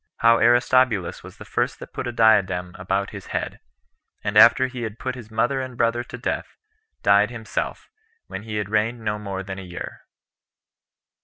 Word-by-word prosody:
How 115 0 +5
Aristobulus 120 -5 +3
Was - - -13
The - - -11
First - - -1
That - - -11
Put - - -4
A - - -2
Diadem 95 -6 +3
About 95 +2 -1
His 100 -2 -9
Head; - - -3 0.6
And 100 - -2
After 115 +4 +7
He 130 -1 -6
Had 110 -1 -5
Put 130 +1 -3
His 120 -4 -10
Mother 120 +5 0
And 130 -2 -7
Brother 120 0 +1
To 125 - -8
Death, 125 - -4 0.5
Died 100 +1 +5
Himself, 110 -3 -4 0.4
When 95 - -7
He 110 0 -6
Had 105 -2 -1
Reigned 110 +2 0
No 105 -1 -2
More 100 -2 -5
Than 95 0 -6
A - - -7
Year. 90 -2 -8
110 Hz, 180 wpm, -23 LUFS, 100-120 Hz, 0.6 s, After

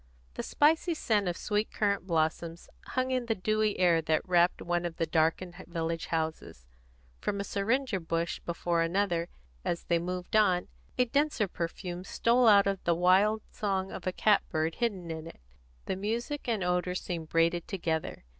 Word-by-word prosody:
The - - -4
spicy 320 +3 +2
scent 210 -9 +1
of 175 -1 -1
sweet 210 +1 -1
currant 200 -3 0
blossoms 165 0 -1 0.2
hung 255 0 -1
in 255 -2 -1
the 225 - +1
dewy 215 +2 0
air 170 -3 +4
that 160 +2 0
wrapped 175 0 +3
one 175 0 -1
of 170 -1 -4
the 165 - +1
darkened 165 +3 0
village 165 -1 -3
houses. 160 - -3 0.5
From 200 - -2
a - - -1
syringa 225 +2 0
bush 165 0 -2
before 170 0 -1
another, 170 0 0 0.3
as 170 - -2
they 170 -1 +1
moved 180 +3 -4
on, 185 -5 +3 0.3
a 250 - +4
denser 280 -4 +1
perfume 175 +1 -5
stole 235 +5 +2
out 200 -2 +7
with 195 -1 -1
the 170 - +2
wild 195 +5 +3
song 195 -2 -2
of 185 - -7
a - - +2
cat 210 +2 +3
bird 160 +1 0
hidden 190 -7 -2
in 160 0 -6
it; - - -12 0.5
the - - -2
music 235 +9 -3
and 220 -5 0
the - - -1
odour 180 0 0
seemed 165 -3 -4
braided 165 +1 +1
together. 165 - -3
180 Hz, 175 wpm, -30 LUFS, 170-210 Hz, 0.5 s, out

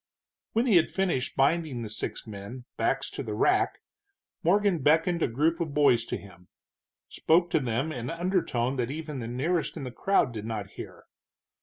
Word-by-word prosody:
When 230 +3 +2
he 220 -8 +5
had 165 - +3
finished 180 -9 -1
binding 140 -3 +1
the - - -4
six 105 - -4
men, 110 +4 -8
backs 135 +4 0
to - - -5
the 110 -5 -4
rack, 385 - +2 0.6
Morgan 195 0 +3
beckoned 165 +4 +3
a - - +3
group 155 +8 +1
of 160 -4 -3
boys 125 -6 +4
to - - -3
him, 90 -3 -15 0.6
spoke 175 +2 +2
to - - +3
them 130 +4 -1
in 125 -3 -4
undertone 165 -8 0
that 120 -1 -1
even 150 -1 -5
the 115 - -5
nearest 150 +8 -1
in - - -5
the 130 - -5
crowd 140 -2 +1
did 110 -1 -6
not 105 -3 -4
hear. - - -10
140 Hz, 180 wpm, -28 LUFS, 120-170 Hz, 0.6 s, he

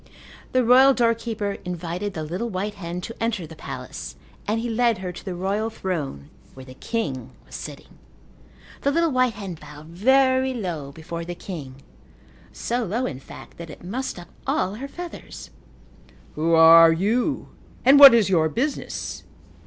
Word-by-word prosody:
The 255 0 +3
royal 260 +3 +7
doorkeeper 230 -3 0
invited 180 +3 -4
the 160 - -3
little 180 +10 -3
white 205 +1 -3
hen 180 -3 -6
to 230 - -7
enter 225 -6 -1
the 160 - -11
palace - - -7 0.3
and 215 +2 0
he 235 - -3
led 235 -1 +2
her 185 -1 -5
to 180 - -11
the 185 -3 -5
royal 200 +5 -1
throne 155 - -5 0.2
where 130 0 -11
the 130 - -11
king 135 - -4 0.2
was - - -18
sitting. - - -9 0.8
The 280 - +1
little 330 +2 +2
white 255 -4 +2
hen 195 -3 -6
bowed 150 +1 -12
very 260 +7 +3
low 170 - -4
before 165 +3 -7
the 175 +1 -6
king 140 -8 -8 0.7
so 240 +1 -2
low, 225 +5 -1
in 130 - -4
fact, - - -13
that 170 -1 -8
it 150 - -11
mussed 240 +8 -4
up 175 - -11 0.2
all 190 - 0
her 255 +6 -6
feathers. 345 +4 -9 0.8
"Who 165 +2 +1
are 165 0 +9
you 225 - 0 0.4
and 275 +2 +7
what 275 -4 +11
is 225 -4 +4
your 165 -5 +2
business?" 270 - -3
195 Hz, 165 wpm, -23 LUFS, 165-240 Hz, 0.8 s, what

